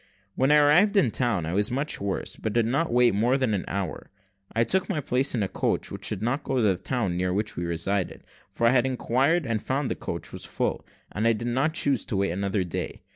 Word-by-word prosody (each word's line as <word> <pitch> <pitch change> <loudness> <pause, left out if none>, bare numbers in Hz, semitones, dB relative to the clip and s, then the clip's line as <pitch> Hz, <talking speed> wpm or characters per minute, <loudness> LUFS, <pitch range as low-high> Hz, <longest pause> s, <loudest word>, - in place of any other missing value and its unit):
When 130 +6 +2
I - - +7
arrived 165 +8 +5
in 130 - +4
town 115 -10 0
I 80 - -3
was 105 +2 +2
much 140 +1 -2
worse, 100 -1 -3
but 110 - -4
did 115 -1 +2
not 140 +8 0
wait 120 -1 +4
more 120 +6 +2
than 130 -5 0
an 100 - -2
hour. 90 -6 -4 0.4
I 115 - +2
took 190 - +1
my 180 -6 -1
place 130 -1 0
in 110 - 0
a - - 0
coach - - -2
which - - -1
did 100 - -4
not 135 +5 -1
go 135 - -2
to 125 - +2
the 100 -3 +4
town 95 -1 -2
near 90 +1 0
which 105 +3 -2
we 85 - -3
resided; 85 +3 -2 0.3
for 115 - -1
I 115 - +6
had 130 0 +3
inquired 135 +6 +1
and 115 -3 -1
found 135 0 -1
that - - -4
coach - - -5
was - - -8
full, - - -2 0.3
and 110 +2 0
I 115 - +4
did 115 +2 -3
not 135 +6 0
choose 140 -5 +2
to 100 - -3
wait 100 -2 +1
another 100 +2 -1
day. 90 - -5
115 Hz, 245 wpm, -26 LUFS, 100-135 Hz, 0.4 s, I